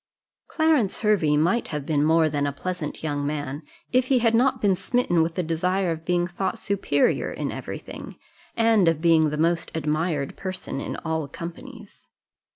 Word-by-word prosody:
Clarence 310 - +1
Hervey 190 -9 +3
might 175 +10 +2
have 150 -3 -4
been 145 -2 +1
more 160 +1 +4
than 145 -1 -1
a - - -1
pleasant 165 +1 -5
young 145 -2 -2
man, 145 -1 -3 0.3
if 255 0 +3
he 265 - +3
had 230 -2 +3
not 255 +2 +3
been 200 -3 +3
smitten 195 -3 +1
with 165 +1 -1
the 180 - 0
desire 180 +3 0
of 160 0 -5
being 175 0 +1
thought 175 +2 -3
superior 195 -8 0
in - - -3
every - - -5
thing, - - -10 0.4
and 225 -5 +4
of 165 -2 +2
being 160 -2 +4
the 150 - -3
most 165 +1 +1
admired 155 -1 -1
person 185 -7 -5
in - - -4
all 160 -2 -1
companies. 205 - -10
170 Hz, 175 wpm, -24 LUFS, 155-200 Hz, 0.4 s, more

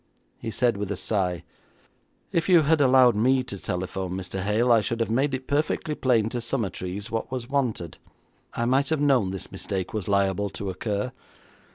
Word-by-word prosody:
He - - -5
said 115 0 +1
with 100 -1 -3
a - - -1
sigh, 90 -4 -1 0.9
'If 165 0 0
you 175 -3 +6
had 155 +1 +3
allowed 130 -3 +6
me 130 +4 +3
to 100 -6 -6
telephone, 90 0 -3
Mr. 95 0 -4
Hale, 110 +5 +2
I 115 -2 +6
should 115 +2 -2
have 115 -1 0
made 135 +3 +1
it 130 0 -7
perfectly 150 +2 0
plain 120 -7 +2
to 120 +1 -3
Summertrees 100 -5 -3
what 115 +2 -3
was 125 -2 -4
wanted. 125 - -2 0.6
I 120 - 0
might 135 +3 +2
have 160 -2 +1
known 135 -9 +3
this 95 0 -6
mistake 95 -2 -4
was 105 -4 -3
liable 100 0 +1
to 95 0 -5
occur. 105 +5 -3
115 Hz, 185 wpm, -25 LUFS, 100-130 Hz, 0.9 s, you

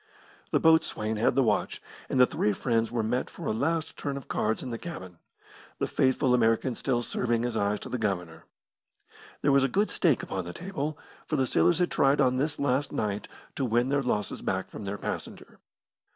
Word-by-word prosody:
The - - +2
boatswain 110 -9 +3
had 110 - +2
the 135 - +4
watch, 110 -3 0 0.3
and 130 - 0
the 125 - +9
three 105 -4 0
friends 115 +1 0
were 120 -2 0
met 125 +4 -1
for - - -9
a - - +1
last 160 +8 -1
turn 140 -1 -3
of 140 - -9
cards 110 +1 -1
in 125 - -5
the 115 - -4
cabin, 95 - -8 0.6
the - - 0
faithful 130 -1 +2
American 115 +1 +2
still 120 -1 -1
serving 120 -1 0
as 120 -2 -2
eyes 100 -1 0
to - - -7
the 125 - -3
Governor. 90 -6 -3 1.0
There - - +4
was 135 -1 +5
a - - +4
good 205 +10 +1
stake 160 - +2
upon 95 -2 -4
the 90 - -6
table, 155 -5 -4 0.3
for 155 - -1
the 135 -3 +2
sailors 165 +6 +3
had 180 0 +1
tried 135 +1 +3
on 130 0 +3
this 150 +3 0
last 140 0 0
night 105 -1 -2 0.3
to 140 - -2
win 120 +1 +2
their 140 0 +2
losses 105 -6 -2
back - - -2
from 105 - -7
their 100 +1 -3
passenger. - - -6
125 Hz, 205 wpm, -28 LUFS, 110-140 Hz, 1.0 s, the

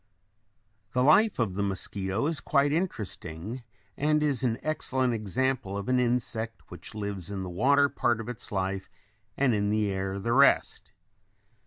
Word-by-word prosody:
] 110 -1 -43
The 125 - +3
life 195 +9 +5
of 110 -6 0
the 100 - -2
mosquito 95 +2 -1
is 160 0 0
quite 140 0 +2
interesting 110 - -4 0.3
and 150 +1 +2
is 140 -4 +1
an 115 -3 +1
excellent 130 -5 0
example 115 -1 -1
of 100 - -5
an 125 0 +3
insect 120 -2 -2
which 90 +4 -10
lives 100 -4 -4
in 100 -2 -4
the 90 - -6
water 140 +10 +4
part 120 -4 0
of 115 - -6
its 125 -2 -5
life 95 -1 -2 0.5
and 130 -3 +3
in 100 -1 +1
the 105 -1 +1
air 95 0 -2
the 115 +4 -1
rest. 140 +2 +3
115 Hz, 165 wpm, -28 LUFS, 100-130 Hz, 0.5 s, life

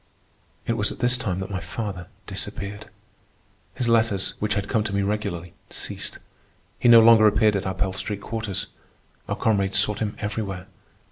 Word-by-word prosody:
It 115 - +1
was 105 -3 0
at - - -8
this 125 +1 +3
time 95 -7 -2
that 95 - -5
my 95 - -2
father 95 +1 -5 0.2
disappeared. 100 +2 -5 0.9
His 125 - -1
letters, 110 -4 +2
which 105 0 0
had 100 -1 -1
come 110 +1 +1
to 105 - -3
me 100 - +1
regularly, 100 -5 -3 0.2
ceased. - - -3 0.6
He 120 - +4
no 115 -1 +10
longer 110 -1 +8
appeared 105 0 +4
at 100 -1 -1
our 95 - -2
Pell 95 0 -1
Street 100 +2 -3
quarters. 105 -3 -3 0.6
Our - - 0
comrades 100 -3 +1
sought 105 +1 +2
him 105 -2 -2
everywhere. 105 -3 -4
105 Hz, 175 wpm, -24 LUFS, 95-110 Hz, 0.9 s, no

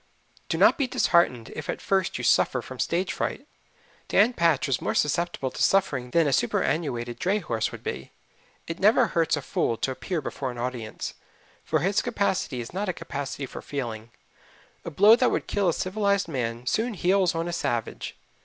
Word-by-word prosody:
Do - - 0
not - - +5
be 275 - +2
disheartened 170 - +2
if 155 - -6
at - - -2
first 190 -2 0
you - - -5
suffer 125 -2 +3
from 130 -1 -10
stage 180 +3 0
fright. - - -3 0.6
Dan 220 +5 +4
Patch 165 - +2
was 135 -3 0
more - - -1
susceptible 150 -3 0
to - - -6
suffering 140 -11 +2
than 165 +5 +3
a 140 - +1
superannuated 120 -2 0
dray 195 +3 +1
horse 115 - -2
would - - -10
be. 65 +1 -5 0.5
It 165 +1 -6
never 220 +5 +5
hurts 165 -3 +1
a 145 - -5
fool 115 - 0
to 130 - -1
appear 165 +6 -3
before 135 -2 -4
an 120 - -7
audience, 120 -3 -4 0.5
for 155 -2 0
his 195 +5 +2
capacity 200 - -1
is 120 - -9
not 195 +2 -2
a - - 0
capacity 140 -2 -5
for - - -8
feeling. 115 -5 -5 0.7
A - - -5
blow 205 +8 +7
that 250 +1 +3
would - - -1
kill 200 -3 +1
a - - +3
civilized 200 +1 0
man 120 -5 -3
soon 220 - 0
heals 185 -1 +2
on 165 +1 -1
a 175 - -3
savage. 120 -8 -3
160 Hz, 190 wpm, -26 LUFS, 125-195 Hz, 0.7 s, blow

